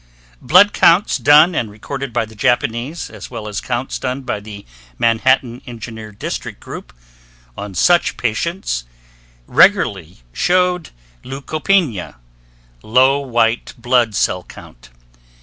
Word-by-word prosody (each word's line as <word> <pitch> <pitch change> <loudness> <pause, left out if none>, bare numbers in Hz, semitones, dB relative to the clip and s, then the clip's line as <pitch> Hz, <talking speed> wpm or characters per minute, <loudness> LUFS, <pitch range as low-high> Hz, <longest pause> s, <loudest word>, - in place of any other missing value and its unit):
Blood 200 +5 +5
counts 175 +5 +4
done 150 +5 +6
and 115 -8 -2
recorded 135 +6 -6
by 115 -1 0
the 110 - -15
Japanese, 120 +5 -1
as - - -10
well 115 -3 -7
as 105 - -4
counts 125 +1 -3
done 130 +1 -3
by 125 -5 -3
the 105 -1 -11 0.3
Manhattan 120 +1 +1
Engineer 110 -2 -8
District 105 - -6
Group, - - -9 0.6
on 100 -2 -7
such 175 - +3
patients 120 - -2 0.6
regularly 90 -2 +2
showed 180 -1 +1 0.3
leucopenia 140 - -1 0.7
(low 130 - +3
white 120 -3 0
blood 120 -2 +1
cell 90 -1 0
count). - - -15
120 Hz, 115 wpm, -18 LUFS, 110-140 Hz, 0.7 s, done